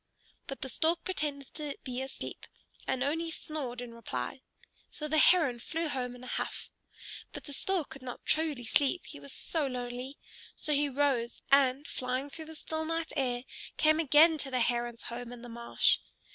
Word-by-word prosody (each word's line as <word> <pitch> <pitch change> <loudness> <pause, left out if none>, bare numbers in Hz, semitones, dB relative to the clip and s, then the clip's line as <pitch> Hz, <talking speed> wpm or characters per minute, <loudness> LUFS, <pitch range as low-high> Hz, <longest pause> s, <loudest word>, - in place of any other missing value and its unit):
But 270 - -6
the - - -3
Stork 325 +7 +2
pretended 290 -7 -3
to 300 -2 -3
be 255 -1 -3
asleep, 265 0 -5 0.4
and 265 0 +1
only 325 +4 0
snored 280 -6 -4
in 240 -1 -7
reply. 220 - -4 0.5
So 300 - -5
the 310 +1 +3
Heron 300 -11 +6
flew 325 +6 -2
home 250 -3 -2
in 250 - -11
a 255 - -2
huff. - - -5 0.6
But - - -6
the 285 - -6
Stork 360 +1 0
could 275 - -8
not 250 -1 -7
truly 310 -5 +1
sleep, 285 +8 +3
he - - -8
was 140 -1 -4
so 315 -4 0
lonely. 250 +2 -4 0.4
So 305 - -1
he 290 0 +3
rose, 265 -4 +1
and, 275 0 +5
flying 255 +1 -2
through 320 +2 -6
the 320 0 -9
still 315 +1 -2
night 330 0 -2
air, 250 -3 0 0.3
came 310 0 +5
again 315 +1 +7
to 275 - -3
the 255 -2 +1
Heron's 240 0 0
home 240 0 -5
in 245 -1 -9
the 245 - -8
marsh. 235 0 +3
275 Hz, 185 wpm, -32 LUFS, 245-310 Hz, 0.6 s, again